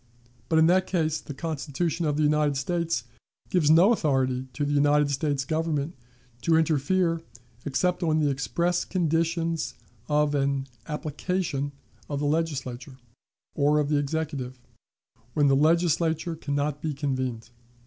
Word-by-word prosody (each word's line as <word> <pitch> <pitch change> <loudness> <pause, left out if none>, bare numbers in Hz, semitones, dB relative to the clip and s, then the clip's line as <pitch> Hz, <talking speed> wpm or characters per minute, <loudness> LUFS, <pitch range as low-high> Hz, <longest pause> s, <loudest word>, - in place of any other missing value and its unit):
But 160 - +3
in 160 - +6
that 185 +2 +3
case 160 -4 0
the 145 - -8
Constitution 160 +1 -2
of 145 -1 0
the 155 - +2
United 150 -1 +2
States 165 -3 -1 0.5
gives 165 -5 +3
no 175 +8 +7
authority 130 - 0
to 145 - -1
the 145 - -1
United 145 0 +3
States 140 -1 -1
Government 155 -1 -1 0.5
to 165 - +3
interfere 165 +2 +1 0.4
except 175 +7 0
on 160 -3 +2
the 150 -2 +2
express 170 +6 0
conditions 165 -1 0 0.3
of 150 0 +2
an 140 -1 0 0.2
"application 150 -1 -2 0.4
of 145 -1 -2
the 145 - -1
Legislature, 140 -4 -2 0.6
or 145 +1 +3
of 150 -1 +1
the 150 - +2
Executive, 145 -3 -3 0.8
when 145 - +4
the 135 - +4
Legislature 165 +2 +2
can 145 -2 -4
not 145 0 -1
be 155 -3 -2
convened." 130 -5 -3
150 Hz, 140 wpm, -26 LUFS, 140-165 Hz, 0.8 s, no